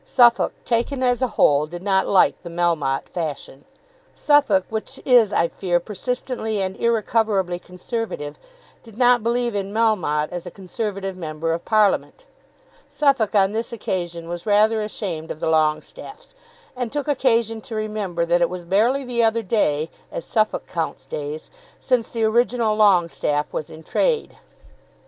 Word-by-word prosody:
Suffolk, 240 -2 +4
taken 255 +3 0
as 245 0 +2
a 255 - +2
whole, 145 +1 +4
did 175 +3 -8
not 190 -1 +2
like 190 - +3
the 175 - -8
Melmotte 165 -6 0
fashion. 150 -4 -6 0.5
Suffolk, 285 -11 +3
which 220 +5 -5
is, 240 -5 +5
I 170 - +2
fear, 175 0 -1
persistently 220 +2 -3
and 190 0 -2
irrecoverably 215 -5 0
Conservative, 180 -5 -5 0.4
did 225 -2 -16
not 245 -1 +4
believe 235 +1 0
in 200 -1 -3
Melmotte 185 -10 +1
as 175 0 -6
a - - -4
Conservative 195 +1 -5
Member 165 -1 -3
of 170 - -5
Parliament. 215 - +1 0.6
Suffolk 270 -8 +1
on 195 -1 +4
this 225 +2 -3
occasion 175 -6 -4
was 175 +2 -6
rather 215 +2 +3
ashamed 185 -7 -5
of - - -6
the - - -3
Longestaffes, 160 - -2 0.4
and 245 -3 -3
took 290 -1 -3
occasion 230 -5 +1
to 225 - -8
remember 210 -6 -2
that 175 +1 +2
it 170 - +3
was 180 -1 -7
barely 230 +10 +2
the 240 -2 0
other 225 0 +2
day, 160 -7 0 0.2
as - - -5
Suffolk 215 -1 0
counts 165 -2 -4
days, 150 +1 -6 0.3
since 250 -3 0
the 230 -1 -2
original 230 0 +2
Longestaffe 175 -7 +2
was 155 - -4
in 160 0 -12
trade. 470 - 0
205 Hz, 155 wpm, -22 LUFS, 175-235 Hz, 0.6 s, is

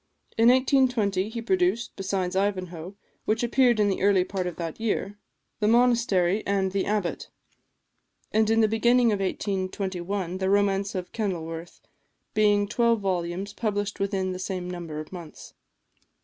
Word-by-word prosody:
In 225 +1 +5
1820 250 -7 +2
he 230 +1 -5
produced, 360 -6 0
besides 190 -2 -2
"Ivanhoe," 185 -2 -2 0.3
which 220 +2 0
appeared 240 -1 +3
in 210 - +4
the 195 - -1
early 195 -1 +4
part 185 -1 -3
of 180 - -5
that 165 +1 -5
year, 205 -2 -2 0.4
"The 210 - +1
Monastery" 230 -5 +3
and 195 -1 +1
"The 195 0 -1
Abbot;" 205 -4 -2 1.0
and 220 0 +2
in 225 0 +4
the 220 - +4
beginning 235 +2 +3
of 205 - 0
1821, 190 -1 -3
the 190 0 0
romance 200 0 +1
of 180 -1 -4
"Kenilworth," 170 -6 -4 0.5
being 205 -1 +3
twelve 235 +1 +2
volumes 185 +1 -2
published 205 -2 -2
within 195 -1 -1
the 185 - -5
same 185 -1 -4
number 170 -4 -6
of 155 - -8
months. 170 -4 -10
200 Hz, 150 wpm, -26 LUFS, 185-220 Hz, 1.0 s, In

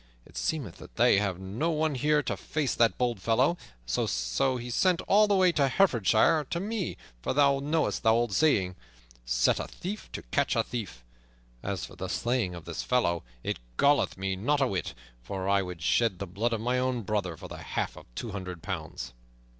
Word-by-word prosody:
It - - -19
seemeth 125 - -2
that - - -13
they 120 -4 +5
have 100 -3 -1
no 100 - -2
one 155 -1 +1
here 150 +3 +2
to - - -2
face 150 -4 -2
that 115 -1 +3
bold 120 -5 0
fellow, 115 +6 +3
and 175 - -8 0.3
so - - 0
sent 125 - +1
all 210 +1 +4
the 205 - +3
way 185 -2 +5
to 145 -5 +2
Herefordshire, 130 - +4
and 145 - -7
to 170 - -1
me, 205 -1 -3 0.2
for - - -1
thou 140 -1 +4
knowest 150 +3 0
the 110 - +4
old 115 -1 +2
saying, 95 -10 +3 0.5
'Set - - +2
a - - -3
thief 205 +4 -7
to - - -5
catch - - 0
a - - +3
thief.' 95 - -6 0.6
As 100 -1 -3
for - - -13
the 95 - -5
slaying 115 -2 0
of 85 - -10
this 85 - -4
fellow, 85 -10 +1 0.2
it - - -2 0.2
galleth 145 -7 +3
me 95 0 -1
not 140 +10 +1
a 135 - +4
whit, 95 - -2 0.3
for 95 +9 -4
I 100 0 +3
would 90 -4 -6
shed 115 +1 +2
the 100 - -4
blood 105 +6 -1
of 110 - -2
my 125 +2 +1
own 125 -2 0
brother 95 -5 -2
for - - -9
the - - -8
half - - -3
of - - -13
two 115 - -4
hundred 90 -4 -6
pounds." 80 -9 -5
115 Hz, 205 wpm, -29 LUFS, 95-145 Hz, 0.6 s, they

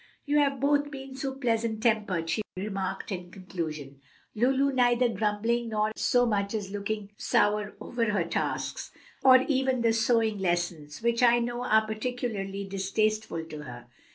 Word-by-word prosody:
"You 295 0 +3
have 280 -2 +2
both 290 +1 +2
been 270 -2 -8
so 270 0 -4
pleasant 230 -4 -1
tempered," 210 -8 +1
she 165 +6 0 0.2
remarked 195 +1 -3
in 180 -2 -5
conclusion, 155 -7 -6 0.3
"Lulu 265 +4 +2
neither 245 -1 +3
grumbling 225 +3 0
nor 215 0 0
so 245 0 +3
much 205 -2 0
as 200 -3 -4
looking 205 0 -4
sour 210 0 +1
over 240 -1 -2
her 205 -5 +1
tasks, 170 - -3 0.3
or 260 -1 +8
even 265 -3 +1
the 230 -1 +3
sewing 225 -2 +2
lessons, 175 -3 -2
which 235 0 +2
I 240 -1 +6
know 240 +1 -2
are 220 -3 +3
particularly 215 -3 -3
distasteful 195 -2 -1
to 155 -2 -8
her. 120 -4 -9
220 Hz, 155 wpm, -28 LUFS, 195-245 Hz, 0.3 s, or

